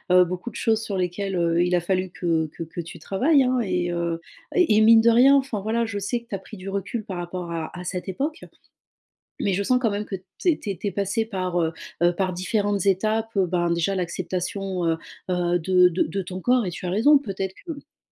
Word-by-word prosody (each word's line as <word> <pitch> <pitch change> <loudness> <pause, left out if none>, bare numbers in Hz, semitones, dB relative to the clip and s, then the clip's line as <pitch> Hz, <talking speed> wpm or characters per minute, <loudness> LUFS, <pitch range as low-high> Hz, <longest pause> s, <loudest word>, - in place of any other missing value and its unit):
heu, 180 - +7
beaucoup 180 +6 -5
de - - -15
choses 220 -1 +1
sur 200 -3 -3
lesquelles, 185 +1 -2
heu, 170 0 +2
il 180 0 0
a - - +3
fallu 185 +1 -1
que 165 -3 0
que 160 - -7
que 165 +2 -6
tu 165 - -10
travailles, 270 +8 +3
hein 255 0 +1
et 180 -3 -1
heu 170 -1 -1 0.3
et 360 - +4
et 215 - +5
mine 225 +1 +8
de 230 +1 +5
rien, 250 +4 +6
enfin, 260 -7 -2
voilà, 225 +3 0
je 215 -2 -4
sais 205 +5 -1
que 235 - -23
tu 200 - -4
as - - -5
pris 200 +3 -12
du 185 +1 -9
recul 200 +3 -3
par 185 - -5
rapport 175 0 -5
à 165 -1 -4
à 180 - -6
cette 180 +2 -4
époque 290 - -3 1.0
mais 200 - +1
je 195 +2 0
sens 250 +5 +2
quand 225 - +2
même 205 +1 -2
que 195 - -4
tu 185 - -9
es 305 - -1
tu 200 -5 -5
es - - -1
passée 200 +4 -1
par, 185 -5 -2
heu 160 0 0 0.3
heu, 175 0 +4
par 185 -1 0
différentes 200 +2 -1
étapes, 215 +3 +1
heu, 195 -2 +3
ben, 175 -1 0
déjà, 170 +3 +1
l'acceptation, 185 +1 -3
heu 165 -1 +1 0.3
heu, 175 -1 +1
de 180 +1 +5
de 180 +1 +1
de 195 - -3
ton 185 +1 -6
corps 245 +2 +2
et - - -1
tu 180 - -7
as - - -1
raison, 230 +11 +5
peut-être 195 -6 -4
qu'il 300 -2 -9
190 Hz, 240 wpm, -24 LUFS, 175-220 Hz, 1.0 s, mine